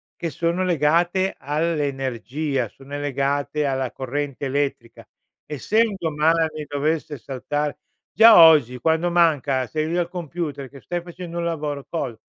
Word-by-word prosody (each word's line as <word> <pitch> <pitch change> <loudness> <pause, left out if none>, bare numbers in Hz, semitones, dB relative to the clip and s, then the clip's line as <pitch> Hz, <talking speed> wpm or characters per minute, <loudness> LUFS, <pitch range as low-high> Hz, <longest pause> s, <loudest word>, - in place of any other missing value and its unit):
che 170 - -4
sono 170 +3 -1
legate 175 +3 +1
all'energia, 140 -3 -2
sono 140 +4 -9
legate 145 +1 -1
alla 135 -2 -1
corrente 140 +2 -4
elettrica. 135 -4 -3 0.4
Essendo 195 - 0
male, 160 +2 +2 0.2
dovesse 150 +1 -2
saltare 145 +4 -4 0.3
già 225 0 +8
oggi, 145 -6 +6
quando 160 +3 +1
manca 150 -6 +2
sei 155 +4 -2
lì 170 - -1
al 175 -1 0
computer 160 -6 -5
che 140 0 -14
stai 175 0 -4
facendo 175 0 -7
un 170 - -2
lavoro 150 -4 -3
col 140 -8 -3
150 Hz, 130 wpm, -22 LUFS, 140-170 Hz, 0.4 s, già